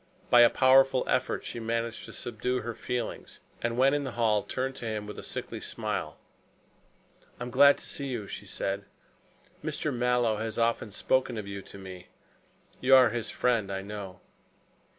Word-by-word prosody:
By 120 - +8
a 120 - +8
powerful 135 0 +5
effort 130 - 0
she - - -5
managed 115 0 -2
to - - -10
subdue 125 +2 -2
her 120 - -4
feelings, 120 0 -5 0.2
and 120 0 -1
when 135 +2 +5
in 145 0 0
the 130 -3 -5
hall 110 -3 +2
turned 130 +4 -3
to 115 - -5
him 105 -1 -3
with 105 - -8
a - - -6
sickly - - -6
smile. - - -4 1.2
"I - - -3
am 120 - -6
glad 140 +2 +7
to - - -8
see 140 - -3
you," 120 -6 -3
she - - -7
said. 100 +1 -3 0.8
"Mr. - - -2
Mallow 120 -2 +2
has 110 0 -4
often 115 -2 0
spoken 130 +4 +1
to 105 -2 -5
you 100 0 -5
of - - -12
me. 95 -2 -10 0.7
You 130 +1 +6
are 130 -3 +7
his 120 -2 -3
friend, 115 -5 +1
I 95 0 -3
know." 100 -2 -7
120 Hz, 180 wpm, -29 LUFS, 105-125 Hz, 1.2 s, By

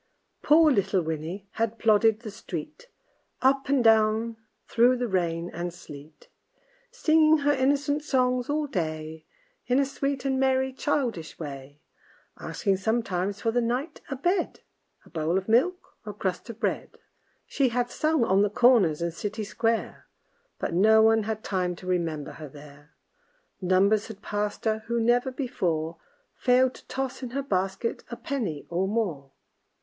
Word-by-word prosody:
Poor 310 +1 +5
little 195 -6 +1
Winnie 160 +5 -5
had 225 0 -2
plodded 220 0 +3
the 220 -3 -7
street, 200 - -8 0.6
Up 270 +1 +3
and 275 -3 +3
down 220 0 +3 0.3
through 245 +2 +4
the 245 0 -1
rain 175 -3 -1
and 175 +1 -4
sleet, 150 -3 -13 0.6
Singing 315 0 +4
her 290 0 +2
innocent 285 +2 +1
songs 255 -3 +1
all 300 +1 0
day, 155 - -4 0.4
In 250 - +2
a 280 - +3
sweet 275 0 -3
and 265 -1 +1
merry 265 0 +1
childish 250 - -2
way; 145 -1 -8 0.6
Asking 195 -3 -1
sometimes 200 -2 -1
for 225 - +1
the 245 +1 +1
night 255 +7 -2
a 275 - -2
bed, 350 +7 -1 0.4
A - - -17
bowl 165 +2 0
of 190 - -3
milk, 270 +12 +1
or 210 -2 -6
a - - -24
crust 190 +2 -3
of 230 -1 -8
bread. - - -2 0.5
She 270 -3 +1
had 245 +1 -1
sung 310 -2 +1
on 195 -1 +3
the 205 - +3
corners 205 -9 +4
and 170 -1 -2
city 210 +5 -4
square, 225 +2 -2 0.5
But - - -3
no 220 +5 +5
one 225 0 +5
had 220 0 -3
time 180 -2 -1
to 180 - -13
remember 165 -5 -2
her 155 -2 -9
there; 145 +1 -15 0.7
Numbers 195 +3 +3
had 220 -2 -11
passed 210 +1 -3
her 220 0 +1
who 235 0 0
never 240 +3 +2
before 170 - -2 0.4
Failed 255 0 +3
to - - -16
toss 265 0 -4
in 255 - -5
her 275 - -1
basket 195 0 -2
a 235 - -5
penny 210 - -3
or 180 +3 -1
more. 185 -11 -2
220 Hz, 160 wpm, -26 LUFS, 180-255 Hz, 0.7 s, Poor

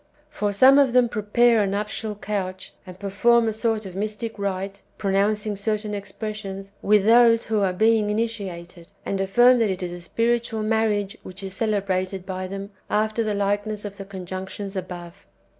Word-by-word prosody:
For 210 -8 -1
some 260 +7 +7
of 270 -4 +3
them 250 -1 +5
prepare 225 +1 +3
a 200 - +1
nuptial 210 +2 -3
couch, 190 -2 -4
and 180 -1 -10
perform 225 +4 +3
a 220 - 0
sort 220 -1 -1
of 185 -1 -8
mystic 215 +2 -4
rite 195 0 -3 0.2
(pronouncing 205 +1 +1
certain 210 +1 -2
expressions) 200 -1 -6
with 210 -1 +3
those 230 0 +6
who 220 -1 0
are 195 -2 +2
being 220 +2 +3
initiated, 195 -6 -4
and 195 -1 -1
affirm 240 +6 +5
that 225 -3 +2
it 185 0 -3
is 175 -1 -4
a 175 - -8
spiritual 230 +3 0
marriage 215 -2 0
which 185 +2 -9
is 190 -1 -6
celebrated 195 -3 -1
by 185 -1 -4
them, 195 +1 -6 0.2
after 215 +2 +1
the 215 -1 -1
likeness 205 +1 -1
of 200 -1 -7
the 195 - -7
conjunctions 190 +1 -6
above. 180 0 -7
205 Hz, 170 wpm, -24 LUFS, 195-220 Hz, 0.2 s, some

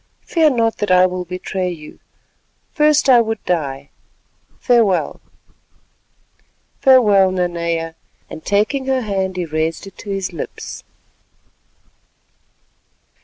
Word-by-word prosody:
Fear 320 -3 +3
not 225 -1 +1
that 210 - -1
I 185 0 +6
will 180 0 -3
betray 180 +1 -3
you—first 290 - -3
would 230 -4 +4
I - - -43
die. 140 -5 -2 0.7
Farewell." 230 -7 +1 1.6
"Farewell, 210 -8 +5
Nanea," 170 -3 -2 0.3
and 160 - -10
taking 215 - 0
her 265 -1 +1
hand 190 -4 -2
he 180 - -1
raised 160 +3 -2
it 195 - -13
to 205 - -9
his 195 -2 -3
lips. 165 - -7
190 Hz, 105 wpm, -18 LUFS, 175-225 Hz, 1.6 s, I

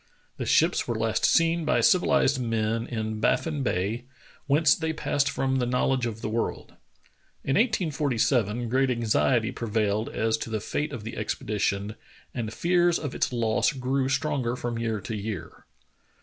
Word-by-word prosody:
The - - -4
ships - - +3
w^ere 120 - -3
last 110 0 +1
seen 165 0 +3
by 155 - +2
civiUzed 160 - +3
men 115 -1 -1
in 110 -2 -3
Baffin 150 +6 +1
Bay, 110 +1 -1 0.4
whence 150 +2 +4
they 160 -1 -2
passed 145 -2 0
from 130 0 0
the 125 -2 0
knowl 125 +2 +1
edge 125 -2 0
of 110 -1 -6
the - - -1
world. 115 +1 -2 0.7
In 135 - 0
1847 135 - +1
great 130 +3 +2
anxiety 120 0 +1
prevailed 110 -2 -1
as 110 0 0
to 115 - -6
the 110 -1 -2
fate 150 +8 -3
of 120 -7 -6
the 115 - -6
expedition, 105 -1 -2 0.4
and 115 -4 -3
fears 175 +5 +2
of 145 -3 -5
its - - 0
loss 115 +2 +1
grew 130 0 -1
stronger 135 -3 0
from 120 -2 -4
year 115 -2 -1
to 110 +4 -5
year. 105 -4 -6
120 Hz, 165 wpm, -26 LUFS, 110-140 Hz, 0.7 s, whence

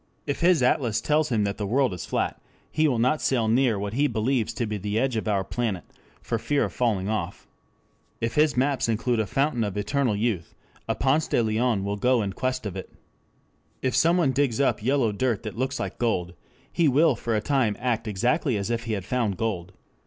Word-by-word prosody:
If 145 - -2
his 170 -5 +4
atlas 120 -3 +2
tells 155 0 +1
him 110 -4 +1
that 100 -1 -2
the 100 - -2
world 125 0 +2
is 90 - -6
flat - - -2 0.3
he 155 0 +2
will 130 -5 +1
not 130 +6 +2
sail 120 -4 +1
near 120 -1 +3
what 100 +1 -4
he 145 +4 +2
believes 115 0 0
to 120 - -2
be 105 -1 -3
the 105 +2 -2
edge 130 +1 +1
of 110 - -2
our 100 -2 +1
planet 110 -4 -2 0.4
for 115 - -2
fear 145 +5 +1
of - - -3
falling 105 -6 0
off. 110 0 -3 0.7
If 115 0 -2
his 150 -3 +3
maps 135 -2 +1
include 115 +1 0
a 110 - 0
fountain 135 +2 0
of 105 -1 -3
eternal 110 +3 0
youth, 105 -5 -2 0.3
a - - +1
Ponce 140 +4 +1
de 120 - +2
Leon 110 -1 +1
will 100 +1 -2
go 125 +1 +2
in 100 -1 -3
quest 130 0 -2
of 100 -3 -4
it. 95 - -6 0.9
If 130 -1 0
someone 170 -3 +3
digs 135 -2 0
up 140 - +2
yellow 130 -1 +2
dirt 115 +1 -1
that 110 - -6
looks 130 +3 -2
like - - -4
gold, 90 -7 0 0.4
he 170 - +3
will 145 +1 +4
for 115 0 -2
a - - +2
time 120 -2 +1
act 120 -2 -1
exactly 120 - +1
as 100 +3 -2
if 115 0 -2
he 115 - -2
had 100 -4 -3
found 115 -6 -1
gold. 95 -6 -2
115 Hz, 215 wpm, -25 LUFS, 105-135 Hz, 0.9 s, his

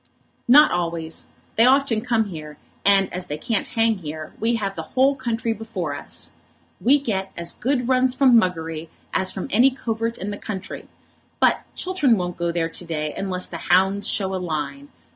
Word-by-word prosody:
"Not 295 +5 +8
always. 170 -2 -3 0.3
They 230 +2 +7
often 265 -4 +3
come 230 -2 +1
here, 155 -4 -8 0.3
and 195 -1 +4
as 180 0 -4
they 150 - -4
can't 220 +5 -1
hang 225 -2 +1
here, 155 -2 -7
we 230 +2 +2
have 200 -3 -2
the 160 - -4 0.2
whole 270 +2 +5
country 230 -3 -2
before 215 -9 -4
us. - - -5 0.5
We 275 +4 +5
get 195 -8 -3
as 170 0 -3
good 250 -1 -1
runs 255 0 +3
from 260 -3 +5
Muggery 165 -6 0 0.2
as 190 0 +1
from 190 - -5
any 245 +6 +6
covert 230 -3 -3
in 200 +3 -4
the 205 - -6
country. 200 -3 -6 0.5
But - - +3
Chiltern 305 -11 +2
won't 180 -1 -3
go 170 0 0
there 165 -1 -1
to 175 - -5
day 155 -3 -3
unless 185 -2 -3
the 170 - -7
hounds 190 +3 +3
show 190 -2 -1
a 185 - -2
line. 180 - -4
200 Hz, 180 wpm, -23 LUFS, 170-235 Hz, 0.5 s, Not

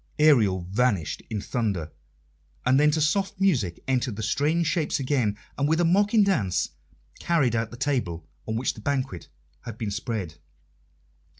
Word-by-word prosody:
Ariel 115 -12 +4
vanished 105 -7 0
in 110 - -2
thunder, 100 -11 -2 0.7
and 130 +2 +4
then 150 +1 +5
to 155 +1 +1
soft 195 +6 0
music 125 - +1
entered 130 -3 0
the 110 - -5
strange 150 +9 +1
shapes 155 -2 0
again, 125 -6 0 0.2
and, 140 - +2
with 160 +1 +2
a 175 - +3
mocking 205 +5 +4
dance, 145 - +1 0.5
carried 140 -9 +1
out 115 -1 -1
the 120 - -10
table 115 - -2 0.2
on 110 - -2
which 120 +3 0
the 110 - -12
banquet 130 -9 -2 0.3
had 115 -2 -8
been 110 -3 -3
spread. 100 - -4
125 Hz, 160 wpm, -26 LUFS, 105-150 Hz, 0.7 s, then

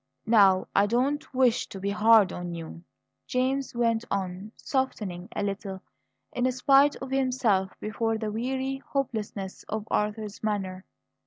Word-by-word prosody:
"Now, 200 -4 +5
I 200 - +5
do 235 +3 +2
not 290 - -6
wish 255 -2 +2
to 195 - -8
be 200 +1 -1
hard 215 -1 +5
on 175 -1 -5
you," 165 0 -8 0.4
James 260 +1 -1
went 230 -1 +1
on, 190 +1 -3
softening 205 -9 -3
a - - -1
little 195 -1 -4 0.5
in 250 +1 +1
spite 275 +3 +5
of 265 0 -8
himself 250 -8 +1
before 225 +1 -1
the 215 -1 -3
weary 265 +4 -2
hopelessness 215 -8 -4
of 215 0 -3
Arthur's 210 0 -2
manner. 195 -3 -2
215 Hz, 145 wpm, -27 LUFS, 195-255 Hz, 0.5 s, Now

